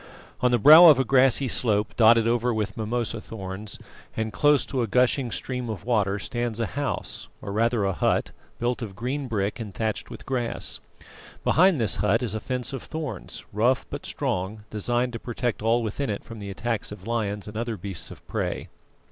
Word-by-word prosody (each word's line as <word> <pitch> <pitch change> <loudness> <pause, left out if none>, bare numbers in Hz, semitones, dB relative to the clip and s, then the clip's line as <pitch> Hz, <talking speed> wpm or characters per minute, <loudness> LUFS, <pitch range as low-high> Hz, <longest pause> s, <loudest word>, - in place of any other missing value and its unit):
On 125 - +3
the 120 - +3
brow 155 +9 +10
of 150 -5 +8
a 135 - +3
grassy 130 0 +4
slope 105 -3 +2
dotted 115 0 +5
over 120 +1 +1
with 105 -3 -2
mimosa 115 0 -2
thorns, 100 -1 -7 0.4
and 110 -1 -2
close 145 +8 +4
to 130 -3 -2
a 115 - 0
gushing 125 +3 +2
stream 125 +1 -3
of 110 -2 -6
water, 105 -5 +1
stands 120 0 -3
a 115 - +1
house, 140 +7 -3
or 100 - -6
rather 115 0 +1
a 95 - 0
hut, - - 0 0.3
built 120 +1 -1
of 105 -4 -6
green 130 +6 -3
brick 105 -2 -2
and 105 -5 -7
thatched 110 -2 -2
with - - -10
grass. 125 -3 -3 0.6
Behind 175 0 +4
this 105 -7 +1
hut 105 +6 +2
is 110 -5 -1
a 110 - -2
fence 125 +3 -3
of 135 - -4
thorns, 155 -3 -6
rough 120 +5 +2
but - - -5
strong, 95 +4 -3
designed 120 +4 0
to 115 - -4
protect 120 -1 -3
all 115 +2 +2
within 115 +5 -3
it 100 - -3
from 115 -1 -10
the 100 -1 -6
attacks 115 +2 -3
of 100 -2 -10
lions 105 -3 -2
and 105 - -9
other 115 0 -3
beasts 95 -2 -3
of - - -13
prey. - - -3
115 Hz, 195 wpm, -25 LUFS, 105-125 Hz, 0.6 s, brow